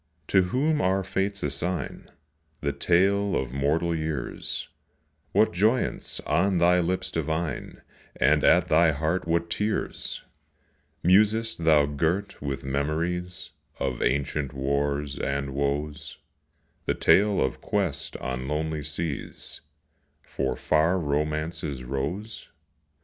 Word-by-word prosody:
to 95 - +5
whom 145 - +1
our 95 +1 +2
Fates 100 +1 -2
assign 80 +5 -3 0.5
The 70 -1 -1
tale 95 +6 +2
of 65 -2 -2
mortal 75 +5 +1
years, 80 -4 -3 0.6
What 110 - +3
joyance 110 +8 +1
on 90 +5 +2
thy 90 +1 +5
lips 90 +2 0
divine 80 -3 -3 0.3
And - - +3
at - - +5
thy 80 0 +4
heart 80 +5 -1
what 85 0 0
tears! 105 +3 -1 0.8
Musest 105 +1 +3
thou 75 -3 +6
girt 80 +8 -1
with 70 -1 -3
memories 85 +6 -2 0.3
Of 60 -2 -2
ancient 70 +1 0
wars 70 +1 -1
and 70 0 -2
woes 75 +1 -2 0.7
The - - +1
tale 105 +1 +4
of 65 - -1
quest 90 -9 -1
on 65 0 -4
lonely 75 +1 -2
seas 75 0 -4 0.6
For 65 -1 -2
far 80 +4 +2
Romance's 75 -2 -2
rose? 80 - -4
80 Hz, 110 wpm, -26 LUFS, 70-90 Hz, 0.8 s, thou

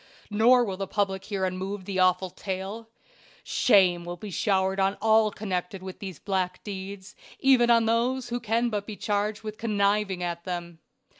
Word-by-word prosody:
Nor 240 +4 +5
will 190 -3 -4
the 195 0 -3
public 195 -2 -1
hear 195 -3 -1
unmoved 185 +1 -4
the 190 -1 -2
awful 185 0 +3
tale. 195 +5 -5 0.5
Shame 185 -6 +4
will 175 0 -6
be 205 +3 -8
showered 190 +1 +1
on 195 +1 +1
all 220 -1 +4
connected 185 -2 -4
with 190 -1 -8
these 190 -5 -7
black 185 -1 -2
deeds, 195 -1 -7 0.2
even 255 -3 +4
on 230 -1 +5
those 240 +3 0
who 240 0 -2
can 235 +1 0
but 205 -1 -3
be 215 - -6
charged 210 +1 -1
with 215 0 -7
conniving 200 -3 +1
at 170 -1 -3
them. 175 -2 -5
200 Hz, 170 wpm, -27 LUFS, 185-220 Hz, 0.5 s, Nor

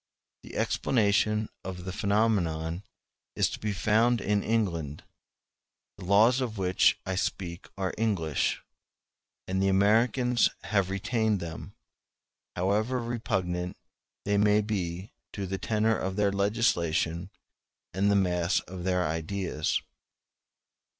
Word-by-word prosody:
The - - -12
explanation 105 -2 +1 0.2
of 90 -1 -6
the 95 - -3
phenomenon 95 -5 0 0.5
is - - +2
to - - -6
be 105 - -2
found 110 +5 +2
in 105 +1 +1
England; 85 -11 -1 1.0
the - - -8
laws 110 +7 +5
of 115 -4 -3
which 95 -1 +3
I 95 - -2
speak 90 -1 -3
are 95 -1 -2
English, 90 -10 0
*o - - -21 0.9
and 95 +1 0
the 95 - +2
Americans 115 +5 +3
have 100 -3 +1
retained 110 +1 0
them, 85 -2 -7 0.8
however 105 +7 +1
repugnant 95 -7 -2 0.5
they 100 0 +2
may 105 +1 +4
be 95 -2 -3 0.2
to 100 - -4
the 95 +1 -4
tenor 110 +3 +1
of 95 0 -3
their 100 -1 +2
legislation 95 -5 0 0.6
and 100 +2 +2
the 100 - +3
mass 90 -1 +2
of 90 -1 -8
their 90 -1 +1
ideas. 80 0 -2
100 Hz, 125 wpm, -28 LUFS, 90-110 Hz, 1.0 s, laws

